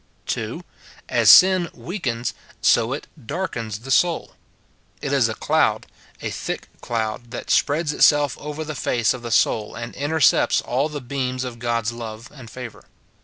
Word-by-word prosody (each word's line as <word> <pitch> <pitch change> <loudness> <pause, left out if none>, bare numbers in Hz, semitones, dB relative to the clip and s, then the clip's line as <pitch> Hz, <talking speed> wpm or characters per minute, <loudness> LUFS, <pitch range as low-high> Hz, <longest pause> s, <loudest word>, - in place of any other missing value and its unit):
[2,] - - -3 0.5
As - - +4
sin 185 -2 +7
weakens, 120 - -3 0.3
so 115 +2 +3
it 140 - -4 0.2
darkens 115 - -4
the 135 +2 -7
soul. 175 +4 +2 0.7
It - - -3
is - - +3
a - - -4
cloud, - - +1 0.4
a - - -2
thick - - -5
cloud, 115 0 -3
that 120 - -5
spreads 150 +1 +2
itself 145 -2 +4
over 150 +1 -5
the 155 0 -5
face 120 -4 +1
of 130 - -8
the 120 - -6
soul, 110 -1 +1
and 120 0 -6
intercepts 145 +2 +3
all 135 +5 -1
the 150 -2 -6
beams 130 0 -3
of 125 -2 -6
God's 115 -1 -1
love 115 0 -8
and 130 -6 -12
favour. 125 -2 -9
125 Hz, 160 wpm, -22 LUFS, 115-150 Hz, 0.7 s, sin